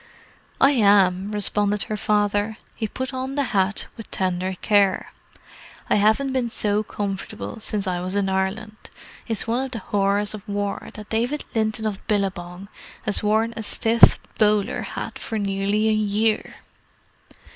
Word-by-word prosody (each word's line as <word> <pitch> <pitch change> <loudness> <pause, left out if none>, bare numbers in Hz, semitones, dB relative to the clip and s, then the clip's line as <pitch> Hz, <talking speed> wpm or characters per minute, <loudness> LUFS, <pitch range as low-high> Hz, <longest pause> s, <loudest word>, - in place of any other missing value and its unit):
"I 275 - +6
am," 200 -5 +4
responded 210 0 0
her 215 - -3
father. 210 +1 +1 0.2
He 220 - -3
put 260 +5 -5
on 260 +1 -3
the 285 - +1
hat 195 +1 +1
with 225 - -10
tender 185 0 -1
care. 200 -3 +2 0.8
"I - - +6
haven't 220 +6 +3
been 250 -3 0
so 210 -2 0
comfortable 205 +2 -5
since 215 -2 -1
I 180 -2 -1
was 185 +2 -3
in 200 -1 +1
Ireland. 190 +3 -2 0.5
It's 225 -3 -2
one 235 +3 0
of - - -6
the 245 - -5
horrors 200 0 0
of 210 0 -9
war 205 0 -3
that 210 -1 -9
David 245 +7 -1
Linton 220 -1 0
of 205 -2 -3
Billabong 195 -2 -2 0.4
has 210 - 0
worn 220 +2 +2
a - - -4
stiff 225 +2 +5 0.2
bowler 210 +1 +2
hat - - -6
for 225 - -3
nearly 200 +1 0
a - - +4
year!" 215 +1 +1
210 Hz, 155 wpm, -23 LUFS, 200-220 Hz, 0.8 s, I